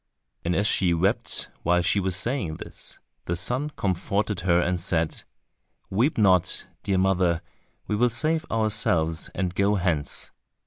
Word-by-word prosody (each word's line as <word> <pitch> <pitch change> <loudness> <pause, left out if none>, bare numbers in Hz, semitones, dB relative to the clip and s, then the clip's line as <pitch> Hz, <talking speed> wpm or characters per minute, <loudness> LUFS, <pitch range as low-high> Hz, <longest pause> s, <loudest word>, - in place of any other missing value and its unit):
And 90 +1 0
as 100 - +1
she 90 -5 +2
wept 95 +4 +2
while 90 +1 +2
she 100 - +2
was 95 -2 -1
saying 115 - -1
this, - - -7 0.3
the 85 - -1
son 130 - 0
comforted 100 +1 -1
her 85 -1 +2
and 90 0 0
said, 85 -1 0 0.7
"Weep 120 +10 +1
not, 95 -4 +3 0.2
dear 95 -2 0
mother, 90 -3 +2 0.4
we 105 - -1
will 120 +3 +3
save 155 +7 0
ourselves, 90 -7 0
and 90 -2 -1
go 100 +2 +2
hence." 85 -7 -1
95 Hz, 145 wpm, -25 LUFS, 85-105 Hz, 0.7 s, not